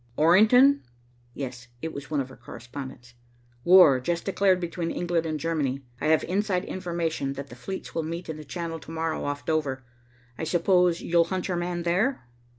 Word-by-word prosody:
"Orrington?" 220 - +6 0.5
"Yes." 125 -2 -6 0.2
It 160 - -3
was 140 -1 -8
one 150 -2 0
of 130 0 -7
our - - -12
correspondents. 125 0 -9 0.5
"War 175 -7 +7
just 170 +7 -2
declared 195 -1 +2
between 170 -1 -3
England 175 -2 -1
and 155 -1 -2
Germany. 145 -4 -1 0.2
I - - 0
have 160 0 +4
inside 190 0 0
information 170 -6 -2
that 140 0 -7
the 120 - -10
fleets 190 +10 -7
will 165 - -1
meet 165 +3 -5
in 160 -1 -5
the 155 - -8
Channel, 165 +2 -5
to - - -14
morrow, 160 0 -2
off 145 -2 -4
Dover. 145 -5 -1 0.6
I - - -3
suppose 175 +1 +2
you'll 170 0 +3
hunt 185 +2 -3
your 180 - 0
man 175 0 -2
there?" 180 - 0
165 Hz, 180 wpm, -26 LUFS, 145-180 Hz, 0.6 s, War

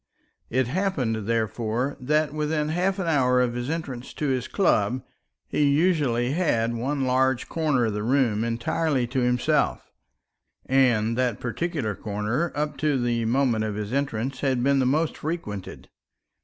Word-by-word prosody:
It 130 +2 +1
happened, 125 - -1
therefore, 115 +3 -1
that 150 +3 +1
within 150 0 -1
half 185 +4 0
an 190 - -2
hour 130 -6 +3
of 125 -1 +1
his 120 +2 -3
entrance 140 -7 -5
to 150 - -1
his 130 -2 -1
club, 125 - +1 0.4
he 150 - 0
usually 140 -6 +2
had 120 -9 +1
one 135 +4 -1
large 130 0 +1
corner 150 -7 +1
of 110 - -1
the 105 - -2
room 115 -2 +2
entirely 125 +4 0
to 125 +3 -2
himself; 125 -1 +1 0.7
and 120 -4 +3
that 125 -4 0
particular 130 - -2
corner 105 - -2
up 150 -1 -2
to 145 -1 +1
the 120 -1 0
moment 120 -2 +2
of 105 -2 -2
his 105 +2 -4
entrance 135 -1 -2
had 130 -3 0
been 140 +1 +3
the 130 - +2
most 155 +4 +1
frequented. 125 - -5
130 Hz, 155 wpm, -25 LUFS, 115-150 Hz, 0.7 s, hour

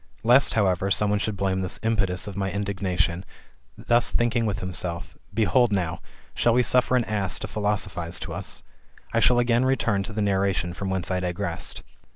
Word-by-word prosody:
Lest, 125 +4 +5
however, 95 -3 +1
some 100 +3 +2
one 105 - +1
should 105 -1 -2
blame 95 -1 0
this 95 -1 -3
impetus 100 -5 0
of 100 - -7
my 95 -1 -1
indignation, 95 -3 -1 0.5
thus 120 0 +2
thinking 120 -1 +1
with 100 -2 -1
himself, 90 -2 -5 0.2
Behold 115 +2 +2
now, 90 -5 -1 0.3
fhall 120 -1 +3
we 125 - +4
suffer 125 +2 +3
an 125 - +3
ass 100 -4 0
to - - -4
philosophise 95 -5 -2
to - - -5
us? - - -5 0.5
I 115 - +3
shall 120 +2 +5
again 120 0 +3
return 120 -6 +1
to 100 - -6
the 105 0 -1
narration 95 -3 0
from 95 +2 -4
whence 95 -1 -2
I 90 - +1
digressed. 90 -1 -3
100 Hz, 185 wpm, -25 LUFS, 95-115 Hz, 0.5 s, Lest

